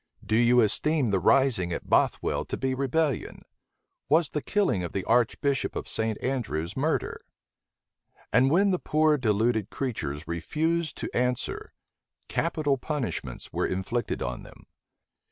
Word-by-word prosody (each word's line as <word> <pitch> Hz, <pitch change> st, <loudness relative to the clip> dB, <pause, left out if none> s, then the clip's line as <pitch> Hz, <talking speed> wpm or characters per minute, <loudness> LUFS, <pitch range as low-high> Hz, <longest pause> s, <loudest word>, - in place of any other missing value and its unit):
Do 110 Hz, -, 0 dB
you 120 Hz, +1 st, +5 dB
esteem 135 Hz, +3 st, +1 dB
the 95 Hz, -, +2 dB
rising 115 Hz, -4 st, +3 dB
at -, -, -4 dB
Bothwel -, -, +1 dB
to -, -, -3 dB
be 130 Hz, -1 st, -1 dB
rebellion? 140 Hz, +1 st, -1 dB, 0.7 s
Was 155 Hz, 0 st, +3 dB
the 150 Hz, -, -3 dB
killing 195 Hz, -, +1 dB
of 85 Hz, -, -5 dB
the 95 Hz, -, -2 dB
archbishop 125 Hz, +4 st, +1 dB
of -, -, -4 dB
St. 110 Hz, -1 st, +1 dB
Andrews 105 Hz, -, -2 dB
murder?" 150 Hz, +4 st, -1 dB, 1.1 s
And 125 Hz, +4 st, +5 dB
when 195 Hz, +6 st, +4 dB
the 180 Hz, -, 0 dB
poor 155 Hz, 0 st, +3 dB
deluded 110 Hz, -2 st, +1 dB
creatures 80 Hz, -, -4 dB
refused 155 Hz, -, -1 dB
to -, -, -5 dB
answer, 125 Hz, 0 st, -1 dB, 0.6 s
capital 150 Hz, -5 st, 0 dB
punishments 145 Hz, -3 st, -4 dB
were -, -, 0 dB
inflicted 95 Hz, +6 st, -2 dB
on 60 Hz, 0 st, -4 dB
them. -, -, -15 dB
125 Hz, 135 wpm, -27 LUFS, 105-150 Hz, 1.1 s, you